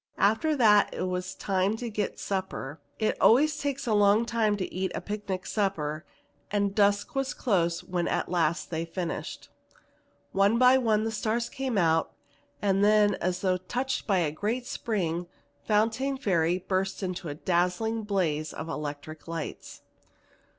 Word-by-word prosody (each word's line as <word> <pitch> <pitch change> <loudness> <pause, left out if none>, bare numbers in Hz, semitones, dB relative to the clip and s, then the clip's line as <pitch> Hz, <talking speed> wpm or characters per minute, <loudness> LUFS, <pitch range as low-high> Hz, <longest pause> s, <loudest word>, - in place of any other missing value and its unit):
After 220 +11 +2
that 210 -6 +4
it - - -2
was 185 0 -3
time 195 +2 0
to 240 - -5
get 210 -2 -3
supper. 185 -7 -4 0.2
It 215 - -1
always 295 +7 +5
takes 280 -1 -2
a 230 - +1
long 205 +2 +4
time 220 -3 +1
to 185 - -4
eat 185 0 -2
a - - -1
picnic 205 -3 -4
supper, 160 -7 -2 0.4
and 200 -1 0
dusk 205 0 +2
was 270 -1 -1
close 170 -7 0
when 175 -1 -2
at - - -1
last 170 -1 0
they 165 0 -1
finished. 170 +1 -5 0.8
One 200 +4 +3
by 255 +1 +6
one 220 -3 +2
the 225 - -1
stars 225 +2 -1
came 260 -4 -3
out 165 -3 +2 0.5
and 195 0 +2
then 210 0 +5
as 180 0 -1
though 185 -2 +2
touched 245 +10 -3
by 195 -3 +3
a 165 -4 +1
great 220 +10 -2
spring, 175 -9 -2 0.4
Fontaine 225 +6 +1
Ferry 175 - +1
burst 190 +1 -2
into 180 -2 -4
a 145 - -5
dazzling 180 +7 0
blaze 170 -8 -1
of - - -6
electric 150 +2 -6
lights. 165 -1 -6
195 Hz, 155 wpm, -28 LUFS, 175-220 Hz, 0.8 s, by